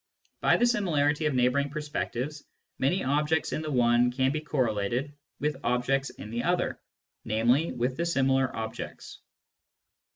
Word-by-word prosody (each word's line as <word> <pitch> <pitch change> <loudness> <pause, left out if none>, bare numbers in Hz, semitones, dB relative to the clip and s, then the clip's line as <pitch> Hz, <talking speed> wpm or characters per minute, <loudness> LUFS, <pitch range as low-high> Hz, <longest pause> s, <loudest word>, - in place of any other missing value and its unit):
By - - +4
the 240 - +3
similarity 155 -10 +2
of 145 - -1
neighbouring 130 +3 +2
perspectives, 150 -1 -4 0.4
many 175 +9 +1
objects 150 +3 +1
in - - -1
the 155 - -4
one 120 -2 +3
can 130 +1 +1
be 155 +1 -2
correlated 125 -1 -1 0.3
with 150 -1 -1
objects 130 +3 +1
in 105 - -10
the 120 +1 -2
other, 175 +4 0 0.4
namely, 120 +9 +2
with 125 +1 -2
the 170 - 0
similar 135 -4 +2
objects. 110 +1 -6
135 Hz, 140 wpm, -28 LUFS, 125-150 Hz, 0.4 s, By